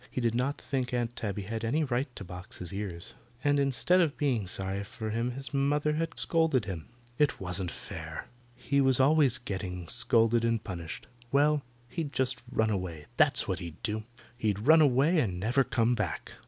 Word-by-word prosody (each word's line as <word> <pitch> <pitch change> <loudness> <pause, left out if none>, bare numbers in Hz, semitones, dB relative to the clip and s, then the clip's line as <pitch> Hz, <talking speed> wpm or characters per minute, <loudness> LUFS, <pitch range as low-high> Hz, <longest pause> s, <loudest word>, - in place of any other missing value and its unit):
He - - -3
did 115 -2 +1
not 130 +4 -1
think 125 -2 -2
Aunt 120 0 -1
Tabby 100 -2 -3
had 110 +3 -4
any 145 +8 +1
right 130 0 0
to 100 - -7
box 90 0 -9
his 90 +1 -6
ears. 95 -4 -6 0.3
And 145 0 +3
instead 140 +7 +3
of 155 -4 0
being 125 -9 0
sorry 95 +1 -1
for 110 +1 -6
him 115 +3 0
his 135 0 -5
mother 145 +2 +1
had 165 +2 -2
scolded 160 -8 +2
him. 90 -6 -6 0.3
It 150 +1 +2
wasn't 90 -1 -1
fair. - - -7 0.3
He 140 +3 +1
was 130 -1 +4
always 135 -2 +5
getting 95 -6 -5
scolded 115 -1 +3
and 115 -1 +1
punished. 85 -5 -6 0.3
Well, 145 +1 +3 0.3
he'd 150 +2 -4
just 130 -1 +1
run 110 -3 +2
away. 90 -6 -3
That's - - +4
what - - -1
he'd 85 -3 -8
do. 110 -1 -2 0.3
He'd 110 -3 -1
run 160 +2 +7
away 145 +4 +4
and 95 -10 -1
never 120 +7 +2
come 115 0 +1
back. 105 -8 -3
120 Hz, 185 wpm, -30 LUFS, 100-140 Hz, 0.3 s, run